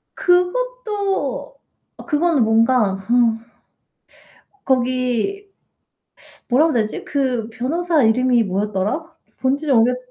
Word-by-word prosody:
그것도 420 +4 -1 0.4
어 - - -12
그거는 300 -2 +1
뭔가 225 -2 +2
허 195 +5 -3 1.5
거기 255 - -1 1.0
뭐라 275 +6 +3
그래야 245 -8 +1
되지? 215 - -6
그 255 -6 -1
변호사 310 +6 0
이름이 240 +1 +3
뭐였더라? 205 - -2 0.4
본지가 275 +2 0
오래 235 +1 +4
돼 - - -5
255 Hz, 215 characters per minute, -20 LUFS, 230-345 Hz, 1.5 s, 오래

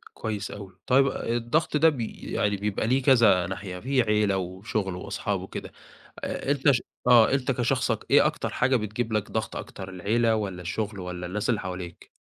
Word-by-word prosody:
كويس 105 -2 -4
أوي، 95 -2 -10
طيب 135 +2 +5
آآ، - - -3
الضغط 150 +7 0
ده 160 +2 +6
بي 120 -7 -5
يعني 100 -1 +1
بيبقى 105 +2 -2
ليه 130 +2 +2
كذا 115 -10 +5
ناحية، 95 -1 -6
في 130 +3 +1
عيلة 105 -3 +2
وشُغل 95 +1 -3
وأصحاب 90 - -3
وكده، - - -7 0.5
أ 140 - -2
أنت 140 0 +4
ش 125 - +1 0.3
آه، 120 -2 +7
أنت 135 0 +1
كشخصك 125 -2 0
إيه - - +6
أكتر - - -1
حاجة 130 +1 +1
بتجيب 110 +1 -2
لك 105 -2 -1
ضغط - - -2
أكتر؟ 95 0 -7
العيلة 110 +5 +1
والَّا 95 -4 -3
الشُغل 105 +3 -3
والَّا 90 -1 -5
الناس 105 +5 -3
اللي 110 - +2
حواليك؟ 90 -2 -7
110 Hz, 180 wpm, -26 LUFS, 95-125 Hz, 0.5 s, آه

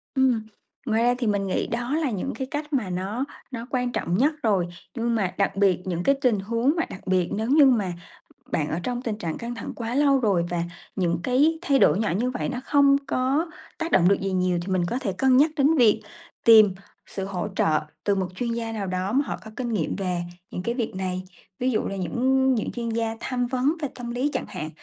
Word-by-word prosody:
Ừm, 255 -5 +2 0.4
ngoài 225 -1 +1
ra 245 - +4
thì 245 - -1
mình 200 -2 0
nghĩ 185 - -1
đó 245 +5 -2
là 305 -6 0
những 210 +7 -3
cái 265 -1 -4
cách 295 0 -4
mà 235 -8 0
nó 195 +8 -2 0.3
nó 235 -1 -6
quan 250 -2 0
trọng 175 -4 -1
nhất 295 +6 +3
rồi, 195 -6 +2 0.3
nhưng 235 0 0
mà 190 -5 0
đặc 200 0 +1
biệt 195 -3 +3
những 175 -1 -2
cái 275 - +4
tình 240 -6 +3
huống 230 +8 +1
mà 330 - +2
đặc 185 - -10
biệt 185 -2 +2
nếu 220 +3 -2
như 290 0 +7
mà 210 -9 +2 0.6
bạn 150 -2 0
ở 165 - -2
trong 245 -1 -2
tình 225 -4 -3
trạng 165 -6 -4
căng 235 +1 -5
thẳng - - -6
quá 235 +1 -4
lâu 280 -2 +4
rồi, 195 -7 +2
và 175 -1 -1 0.3
những 170 -3 0
cái 295 +6 +3
thay 280 -6 +2
đổi 200 - +5
nhỏ 215 -5 0
như 250 +3 0
vậy 250 - -3
nó 255 -2 -3
không 280 -1 +5
có 275 +7 +1 0.3
tác 330 0 -3
động 180 -1 +5
được 200 - +4
gì 195 0 -1
nhiều 180 -1 +1
thì 190 +2 -5
mình 175 -2 +1
có 245 - -1
thể 205 -8 -2
cân 255 +6 +3
nhắc 305 +3 +5
đến 290 +3 +4
việc 230 -5 +5 0.4
tìm 215 -4 +7 0.3
sự 195 - -5
hỗ 190 0 -3
trợ 155 -1 +3 0.2
từ 200 - +2
một 190 -1 -1
chuyên 240 +2 -2
gia 230 -1 -3
nào 205 -3 -3
đó 185 +2 -2
mà 275 +3 +2
họ - - -4
có 220 - -9
kinh 245 -2 -3
nghiệm 170 -7 -1
về 180 -3 -2 0.3
những 180 - -4
cái 235 +3 -1
việc 230 -6 -3
này. 185 -1 -3 0.4
Ví 255 +1 +1
dụ 215 - +1
là 195 - -4
những 260 +8 +2
những 220 - -2
chuyên 235 -1 -4
gia 225 0 -1
tham 245 -1 -1
vấn 260 +5 +1
về 290 - 0
tâm 240 -1 -6
lý 255 +5 0
chẳng - - -2
hạn, 155 +1 -5
230 Hz, 240 wpm, -25 LUFS, 190-260 Hz, 0.6 s, như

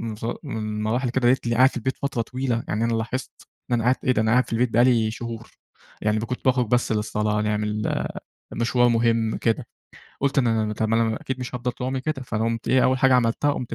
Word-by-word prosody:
ف 110 - -7 0.2
من 135 -7 -5
المراحل 110 +4 -1
كده 120 0 +1
لقيتني 120 -2 +2
قاعد 130 +2 +6
في - - -6
البيت 130 +3 -2
فترة 140 -4 -2
طويلة، 125 0 -2
يعني 110 +2 -1
أنا 115 0 +1
لاحظت 115 +4 -3 0.4
إن - - +3
أنا 115 - -1
قعدت 125 +1 +1
إيه 130 - +4
ده؟! 110 - +2
أنا 110 0 +1
قاعد 125 +2 +4
في - - -5
البيت 120 +2 +2
بقى 120 +2 +5
لي 115 -4 +3
شهور! 115 0 -7 0.5
يعني 105 0 +1
ب - - -4
كُنت 125 +2 -5
باخرج 125 -2 +3
بس 120 +1 +1
للصلاة، 105 -1 0
نعمل 105 0 -1 0.5
مشوار 120 +1 +2
مهم 115 -1 +1
كده. 115 -2 -1 0.5
قُلت 140 0 +1
إن 130 - +3
أنا 115 -1 +2
ما 105 0 -3
طَب 110 +1 -1
ما 115 +1 +3
أنا 110 -1 0
أكيد 130 -5 -4
مش 125 - -6
هافضل 125 0 -2
طول 125 - -5
عمري 130 0 -2
كده، 140 -1 -3
فقمت 115 0 -2
إيه 130 0 +4
أول 130 0 +3
حاجة 130 0 +4
عملتها 125 +4 +2
قُمت 125 -4 -4
115 Hz, 235 wpm, -24 LUFS, 110-130 Hz, 0.5 s, قاعد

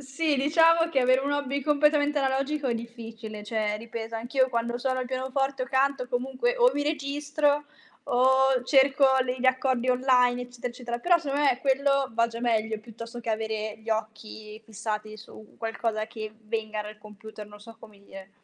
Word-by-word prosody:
Sì, 285 +3 -1
diciamo 330 +4 +4
che 270 - +2
avere 255 +1 +4
un 285 +1 -1
hobby 280 -1 -1
completamente 295 0 +2
analogico 275 +2 -1
è 235 - 0
difficile. 225 -2 -8
Cioè, 210 -1 -1
ripeto, 230 0 -7
anch'io 255 +4 +1
quando 235 0 -2
suono 260 0 -1
il 250 - -3
pianoforte 265 +1 -2
o - - -15
canto 265 0 +1
comunque 260 - -1
o - - +5
mi 290 - -1
registro 290 0 0 0.4
o 265 +1 +3
cerco 270 +1 +4 0.2
le 255 0 -3
gli 260 - +1
accordi 260 -1 +1
online, 250 -1 +3
eccetera, 245 0 -6
eccetera. 240 -1 -5
Però, 350 +5 +4
secondo 295 -4 -5
me, 280 -3 +2
quello 275 0 +1
va 230 +1 +2
già 230 0 -7
meglio 220 -2 0
piuttosto 230 +2 -10
che 235 -1 -8
avere 220 -1 -2
gli 225 +1 -7
occhi 215 0 -5
fissati 215 0 -5
su 215 0 -14
qualcosa 225 -1 -2
che 220 -2 -7
venga 215 -1 -3
dal 210 0 -8
computer, 215 0 -11
non 210 0 -14
so 225 +2 -13
come 215 -3 -16
dire. 195 0 -12
245 Hz, 175 wpm, -27 LUFS, 220-275 Hz, 0.4 s, o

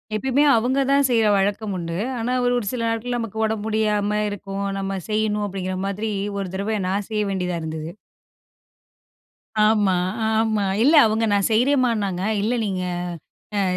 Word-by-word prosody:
எப்பயுமே 265 +6 +2
அவுங்க 255 +4 +1
தான், 280 -1 +4
செய்ற 230 -2 +3
வழக்கம் 205 +1 -1
உண்டு. 170 0 -4 0.2
ஆனா, 245 +2 -1
ஒரு 245 - +2
ஒரு 210 - -6
சில 235 -2 -2
நாட்கள், 230 +2 -2
நமக்கு 225 -2 -5
உடம்பு 215 -1 -2
முடியாம 210 -1 +1
இருக்கும். 200 -1 -5
"நம்ம 195 0 -3
செய்யணும்." 210 -1 0
அப்படிங்கிற 185 -1 -4
மாதிரி, 210 +2 -3 0.3
1 195 - -3
தடவ 205 +2 -1
நான் 200 +1 -2
செய்ய 210 -1 0
வேண்டியதா 180 -2 -2
இருந்தது. 160 0 -5 1.7
ஆமா, 210 -4 +3 0.3
ஆமா. 220 -1 +1 0.2
இல்ல, 295 +6 +5
அவுங்க 220 +1 +1
நான் 200 -1 +2
செய்றேன்மான்னாங்க. 225 -6 +1 0.2
"இல்ல 225 +4 0
நீங்க, 190 -3 -2 0.8
அ - - +2
210 Hz, 150 wpm, -22 LUFS, 195-225 Hz, 1.7 s, இல்ல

